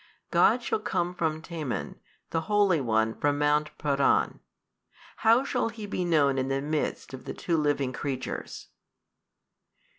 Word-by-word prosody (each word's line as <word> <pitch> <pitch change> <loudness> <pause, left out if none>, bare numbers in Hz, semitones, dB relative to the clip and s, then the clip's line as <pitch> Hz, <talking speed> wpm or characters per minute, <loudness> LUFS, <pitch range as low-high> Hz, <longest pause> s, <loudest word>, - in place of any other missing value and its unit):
God - - +4
shall 445 - 0
come 175 - -1
from 160 -2 -2
Teman, 160 -7 -4 0.3
the 165 - 0
Holy 200 -6 +3
One 110 -2 +1
from 145 +3 0
mount 150 +1 +2
Paran. 140 -2 +2 0.8
How 230 +3 +4
shall 275 - 0
He 220 -2 -7
be 195 -2 -2
known 145 -6 +3
in 130 - -1
the 135 0 0
midst 150 -1 -2
of 130 - -8
the - - -5
two 170 - -1
living 145 -4 +1
creatures? 135 -1 -5
150 Hz, 145 wpm, -28 LUFS, 140-175 Hz, 0.8 s, God